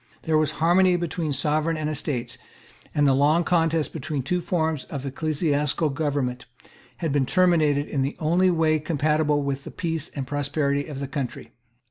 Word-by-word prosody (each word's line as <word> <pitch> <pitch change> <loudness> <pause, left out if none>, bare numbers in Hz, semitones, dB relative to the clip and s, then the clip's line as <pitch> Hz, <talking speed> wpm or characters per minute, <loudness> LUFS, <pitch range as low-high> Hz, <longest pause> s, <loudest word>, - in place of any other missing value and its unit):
There 160 - +1
was 155 0 0
harmony 180 +3 +4
between 170 -1 -2
the 145 - -1
Sovereign 155 +3 0
and 155 -1 -2
the - - -1
Estates; 130 -5 -3 0.6
and 145 - +3
the 135 - +5
long 150 +5 +3
contest 165 -2 +1
between 150 -3 -3
two 180 +6 -1
forms 160 -4 -1
of 140 -2 -6
ecclesiastical 150 +1 0
government 140 -4 -2 0.5
had 165 -4 -2
been 135 -2 +1
terminated 155 -6 +3
in 140 - -2
the 135 +2 -1
only 175 +4 +2
way 160 -2 +2
compatible 150 -1 +1
with 140 0 -3
the - - -8
peace 165 -2 -3
and 135 -2 -5
prosperity 145 0 -1
of 150 -3 -7
the 140 0 -4
country. 135 -2 -5
150 Hz, 175 wpm, -24 LUFS, 140-165 Hz, 0.6 s, the